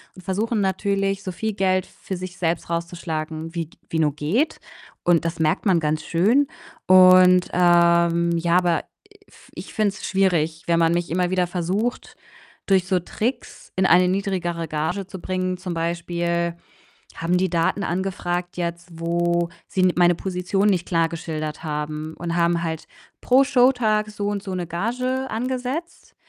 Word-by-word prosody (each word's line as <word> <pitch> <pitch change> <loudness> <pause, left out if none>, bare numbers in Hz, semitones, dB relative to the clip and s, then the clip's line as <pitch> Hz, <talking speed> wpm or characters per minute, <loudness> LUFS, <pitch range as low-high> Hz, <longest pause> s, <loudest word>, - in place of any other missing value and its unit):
und 185 - -12
versuchen 210 +4 -1
natürlich, 195 0 0
so 185 - -5
viel 220 +5 -2
Geld 185 -1 +1
für 190 - -7
sich 180 0 -7
selbst 170 -1 -1
rauszuschlagen, 165 -1 -4
wie 170 -1 -2
g 160 - -23
wie 160 - -1
nur 150 -3 +1
geht. 195 - 0 0.4
Und 170 -2 +3
das 165 0 -3
merkt 160 +6 +1
man 185 -4 +4
ganz 155 0 -1
schön. 225 +12 +2 0.4
Und, 185 -1 +7
ähm, 170 -1 +4
ja, 170 +1 +2
aber 175 -3 +1 0.3
i - - -21
f - - -20
ich - - -9
finde 215 -2 +2
es 195 - -7
schwierig, 165 -5 +1
wenn 170 -1 +3
man 165 0 +3
mich 175 -1 -1
immer 180 +1 0
wieder 180 -1 +1
versucht, 185 +7 -2 0.5
durch 190 -2 +3
so 185 -1 +2
Tricks 225 +8 -4
in 190 - +3
eine 180 0 +5
niedrigere 180 -3 -2
Gage 160 +6 -2
zu 190 - -8
bringen. 185 0 -2
Zum 180 -1 -5
Beispiel 170 0 -2 0.6
haben 170 +2 0
die 185 +1 +1
Daten 170 +4 +1
angefragt 180 -1 -3
jetzt, 170 0 -4
wo 170 0 0 0.2
sie 190 - -1
n 185 -1 +4
meine 175 0 +4
Position 190 +2 -1
nicht 180 -3 0
klar 165 -2 +2
geschildert 160 -2 -5
haben 150 0 -4
und 170 -1 -3
haben 170 0 +2
halt 160 -1 -4 0.3
pro 260 +2 +5
Showtag 245 -6 +2
so 205 -1 -4
und 205 -1 -2
so 190 -2 -4
'ne 180 -1 -3
Gage 255 +9 -2
angesetzt. 255 +7 -4
180 Hz, 165 wpm, -23 LUFS, 170-195 Hz, 0.6 s, Und